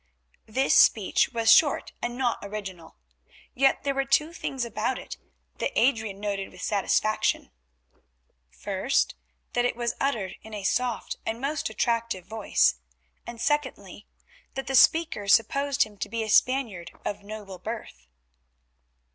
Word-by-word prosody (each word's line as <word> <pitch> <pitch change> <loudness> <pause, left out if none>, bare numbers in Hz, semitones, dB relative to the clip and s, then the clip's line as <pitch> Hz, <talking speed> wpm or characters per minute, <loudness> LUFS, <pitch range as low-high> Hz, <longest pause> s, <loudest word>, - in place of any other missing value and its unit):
This 260 +5 +1
speech - - +4
was 230 -2 +3
short 290 -3 +3
and 240 0 -3
not 245 -3 0
original. 195 -4 -7 0.6
Yet 270 +1 +2
there 280 -1 0
were 275 0 0
two 300 +4 +2
things 265 -6 -3
about 235 +2 -2
it - - -8 0.4
that - - -2
Adrian 220 -6 +1
noted 200 -1 -3
with 185 - -11
satisfaction; 215 +1 0 1.0
first, - - -1 0.4
that 245 - +2
it 245 - 0
was 235 0 -1
uttered 225 -9 -1
in 220 0 -9
a 205 - -6
soft 240 +3 -1
and 225 +1 -3
most 285 +1 -2
attractive 230 -4 -1
voice, 210 - +1 0.5
and 235 -1 -8
secondly, 260 - -2 0.5
that 270 - -3
the 270 - -4
speaker 310 -6 +4
supposed 280 +6 +3
him 210 -1 -12
to - - -3
be 230 -1 -2
a 220 - -5
Spaniard 225 -9 +2 0.2
of 205 0 -3
noble 200 -2 -9
birth. - - -7
230 Hz, 140 wpm, -26 LUFS, 205-265 Hz, 1.0 s, speech